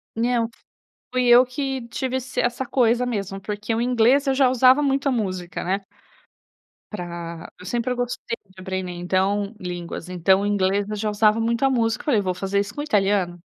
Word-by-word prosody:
Não, 235 0 +1 0.6
fui 250 -1 +1
eu 240 +1 +8
que 265 -1 -4
tive 260 +2 -2
essa 255 -1 -3
essa 245 +2 0
coisa 245 -1 +2
mesmo, 195 -5 -3
porque 210 +2 -3
o 225 - 0
inglês 250 +3 +3
eu 270 - +2
já 265 -1 +4
usava 255 +3 +5
muita 275 0 +1
música, 185 -7 -3
né. 195 +3 -1 1.1
Para 170 -4 -6
eu 180 - -13
sempre 240 +4 -1
gostei 245 -1 -3
de 190 0 -17
aprender, 190 -1 -4
então, 190 +4 0
línguas, 175 -2 -6
então 185 +2 +3
o 205 - -1
inglês 200 0 +1
eu 215 - -3
já 215 +1 -1
usava 215 +1 +3
muito 230 +2 0
a 270 - +5
música. 225 -3 +1
Eu - - -25
falei: 255 -8 +3
"Vou 185 -2 -1
fazer 195 +2 -1
isso 205 +2 -3
com 290 - -3
o - - -3
italiano". 195 - +1
215 Hz, 190 wpm, -23 LUFS, 190-250 Hz, 1.1 s, eu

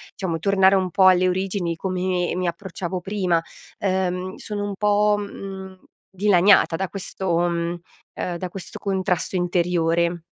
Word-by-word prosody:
diciamo, 180 -4 -2
tornare 190 +2 +4
un 185 -1 0
po' 190 0 +5
alle 185 0 +5
origini, 185 -2 -1
come 180 0 -1
mi 180 0 -1
approcciavo 180 +1 -4
prima. 185 -3 0 0.4
Ehm, 185 -1 -1
sono 205 -1 -5
un 200 - -4
po', 210 +1 +3
mhmm, 190 -2 -7 0.3
dilaniata 190 -2 +4
da 190 +3 -2
questo 190 -3 -2
mhmm, 170 0 -1 0.4
ehm, 175 -1 -3
da 180 +1 -5
questo 185 0 -8
contrasto 190 -2 -1
interiore. 170 -1 +1
185 Hz, 140 wpm, -23 LUFS, 175-195 Hz, 0.4 s, po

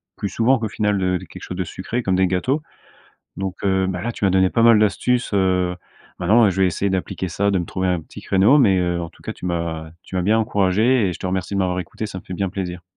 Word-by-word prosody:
plus 100 - -3
souvent 125 +5 +2
qu'au 110 - -2
final, 105 -2 0
heu, 90 0 +1
de 95 - -10
quelque 80 - -12
chose 90 - -6
de 95 - 0
sucré 105 +8 -4
comme 95 -3 +1
des 95 0 +3
gâteaux. 125 - 0 0.8
Donc 95 -1 -3
heu 95 -1 +2
bah, 90 -2 -3
là, 120 +4 -2
tu 105 - -2
m'as 95 - +3
donné 95 0 +3
pas 115 - +1
mal 115 -2 +7
d'astuces, 120 +4 +1
heu. 90 -2 +1 0.4
Maintenant, 115 +2 +4
heu, 100 - +4
je 95 - -3
vais 95 - +5
essayer 100 +3 -1
d'appliquer 95 0 -2
ça, 100 +4 0
de 95 - +1
me 85 - -3
trouver 95 +1 -2
un 90 -2 0
petit - - -12
créneau 100 +9 +4
mais 105 -9 +4
heu, 90 -1 0
en 85 - -5
tout - - -22
cas, - - -4
tu - - -9
m'as 85 -2 -3
tu - - -9
m'as 90 - +1
bien 105 +5 +3
encouragé 105 +3 +2
et - - -3
je 80 - -10
te - - -3
remercie 95 +1 -2
de 100 - 0
m'avoir 90 -1 0
écouté. 90 +5 -5
Ça 95 - -7
me - - -18
fait 95 - -7
bien 95 +1 -2
plaisir. 90 -2 -5
95 Hz, 280 wpm, -21 LUFS, 90-105 Hz, 0.8 s, mal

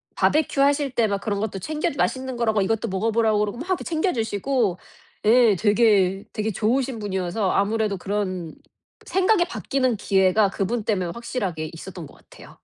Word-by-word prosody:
바베큐 300 -2 +2
하실 285 0 +3
때 235 -3 +1
막 200 -1 -1
그런 205 -2 -2
것도 200 -3 -3
챙겨 310 - -2
주 - - -10
맛있는 260 -1 -1
거라고 220 -3 +1
이것도 225 +2 -1
먹어 195 +4 -1
보라고 220 -1 +2
그러고 210 +3 -2
막 360 +3 -1
챙겨 335 +3 0
주시고 220 -3 -1 0.5
예 230 -2 +5
되게 205 -3 +3
되게 215 +1 -2
좋으신 245 +5 0
분이어서 190 -1 -2
아무래도 210 0 0
그런 185 -4 -3 0.5
생각이 380 -1 +2
바뀌는 255 -8 -1
기회가 195 +1 +3
그분 205 +4 -2
때문에 185 -6 -1
확실하게 195 -10 -4
있었던 170 -1 -9
것 - - -18
같아요. - - -16
220 Hz, 380 characters per minute, -23 LUFS, 195-255 Hz, 0.5 s, 예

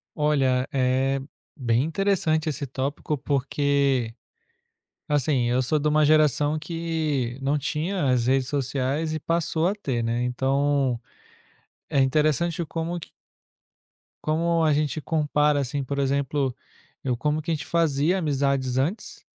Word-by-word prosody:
Olha, 135 -4 +2
é 135 +1 +1 0.4
bem 120 -2 +1
interessante 165 -2 +1
esse 145 -2 -2
tópico, 140 +3 -3
porque, 140 -3 0 1.0
assim, 140 -3 +1
eu 125 +2 +2
sou 150 +5 +1
de 150 +1 0
uma 155 0 +3
geração 150 0 +3
que 155 -6 -2
não 140 +2 +1
tinha 155 +3 -1
as 120 -2 +2
redes 130 0 +2
sociais 140 +3 -1
e 155 - -1
passou 165 +1 0
a 195 - +1
ter, 130 - -2
né, 115 +1 0
então 135 0 +1 0.9
é 140 - +3
interessante 155 +5 +1
como 165 +2 -3
que - - -10 1.2
como 165 +2 +1
a 155 - +4
gente 150 +1 0
compara, 150 0 +1
assim, 140 +1 -2
por 140 +2 -3
exemplo, 140 -1 0 0.5
eu 125 -2 -1
como 150 +4 0
que 165 - -3
a - - +2
gente 150 -3 -4
fazia 165 +2 +1
amizades 140 -4 0
antes 160 +12 -2
145 Hz, 135 wpm, -25 LUFS, 130-155 Hz, 1.2 s, a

